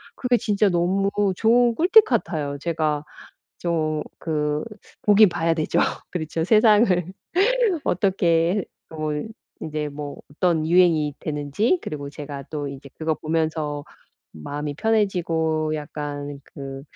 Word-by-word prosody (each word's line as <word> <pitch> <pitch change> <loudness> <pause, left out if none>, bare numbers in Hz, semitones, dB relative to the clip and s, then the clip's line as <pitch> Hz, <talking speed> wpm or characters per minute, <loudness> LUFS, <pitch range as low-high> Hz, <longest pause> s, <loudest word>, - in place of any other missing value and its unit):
그게 250 -1 +1
진짜 210 -2 +2
너무 185 +3 +1 0.3
좋은 235 +3 +3
꿀팁 385 - +6
같아요. 155 - -1
제가 155 -2 -1 0.6
좀 155 -3 -1 0.2
그 150 -2 -1 0.4
보긴 210 -1 +6
봐야 165 -1 +1
되죠. 155 -1 -1 0.3
그렇죠. 160 -1 -2
세상을 215 +2 +5 1.0
어떻게 180 -1 +1 0.2
뭐 155 -1 -3 0.5
이제 150 -1 -3
뭐 145 0 -7
어떤 160 0 +1
유행이 165 -3 +3
되는지 150 - 0
그리고 145 -2 -5
제가 145 -1 -7
또 145 -2 -4
이제 140 0 -9
그거 160 0 0
보면서 155 -1 -2 0.5
마음이 145 - -5
편해지고 165 -6 0
약간 145 -1 -6
그 135 -1 -8
160 Hz, 235 characters per minute, -23 LUFS, 150-185 Hz, 1.0 s, 꿀팁